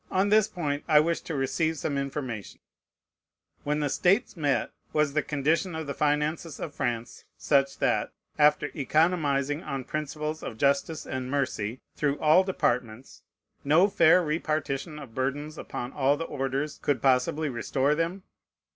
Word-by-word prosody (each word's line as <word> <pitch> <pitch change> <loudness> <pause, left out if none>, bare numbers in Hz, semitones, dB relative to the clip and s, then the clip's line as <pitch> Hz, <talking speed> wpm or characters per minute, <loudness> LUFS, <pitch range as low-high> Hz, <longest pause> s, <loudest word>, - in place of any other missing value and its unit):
On 190 +2 +1
this 215 0 +5
point 150 -8 -3
I 155 -2 +6
wish 165 +2 +1
to 160 - -5
receive 160 +4 0
some 145 0 -2
information. 135 -6 -4 1.0
When 150 +1 0
the 145 - +1
States 195 - +2
met, 145 -5 0 0.2
was 150 -2 +2
the 150 - +2
condition 160 +5 0
of 160 0 -4
the 140 - -4
finances 150 +2 -1
of 150 - -5
France 120 -4 -3
such, 140 -1 +2
that, - - +1 0.3
after 150 -1 +4
economizing, 145 -1 +1
on 135 -7 -4
principles 155 +2 -4
of 110 - -6
justice 140 +4 +1
and 130 -1 -4
mercy, 130 -4 -2
through 145 -1 0
all 155 +5 +5
departments, 125 - -2 0.4
no 155 +7 +5
fair 180 -1 +5
repartition 155 -1 -2
of 140 -6 -10
burdens 140 +4 -2
upon 120 +1 -6
all 140 0 +2
the 165 - -3
orders 135 +1 -3
could 140 -4 +1
possibly 135 +5 +2
restore 135 +3 0
them? 170 +4 -2
150 Hz, 150 wpm, -27 LUFS, 135-160 Hz, 1.0 s, I